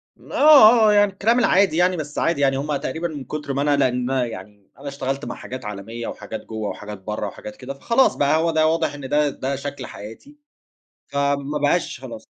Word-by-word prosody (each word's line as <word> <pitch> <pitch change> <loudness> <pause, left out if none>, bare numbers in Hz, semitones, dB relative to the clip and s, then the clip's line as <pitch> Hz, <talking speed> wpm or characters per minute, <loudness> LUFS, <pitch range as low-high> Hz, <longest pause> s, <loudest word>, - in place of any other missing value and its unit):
م - - -17
آه، 240 -7 +7
آه. 210 - +5
يعني 205 -1 +4
الكلام 225 +5 +2
العادي 195 -7 +3
يعني، 180 +1 +2
بس 150 -2 -5
عادي 165 -4 0
يعني، 135 -1 +2
هم 145 +2 -2
تقريبًا 150 +4 -3
من 150 -4 -7
كُتر 150 +1 -5
ما 140 - -1
أنا 140 -2 +2
ندما 125 +1 -1
يعني 105 -2 -11
أنا 140 - -9
اشتغلت 135 0 -4
مع - - -5
حاجات 130 -3 -8
عالمية 105 +3 -6
وحاجات 110 - -7
جوّه 110 -2 -4
وحاجات 105 0 -8
برّه 105 +1 -4
وحاجات 105 +2 -9
كده، 135 +1 -7
فخلاص 230 - +2
بقى، 145 +2 +2
هو 165 +1 +1
ده 155 -1 +3
واضح 160 -2 0
إن 135 -2 -8
ده 150 0 +2
ده 140 0 -4
شكل 140 -1 -6
حياتي، 110 - -11 0.7
فما 140 +1 -1
بقاش 145 -1 0
خلاص. 120 -4 -9
140 Hz, 205 wpm, -22 LUFS, 125-160 Hz, 0.7 s, آه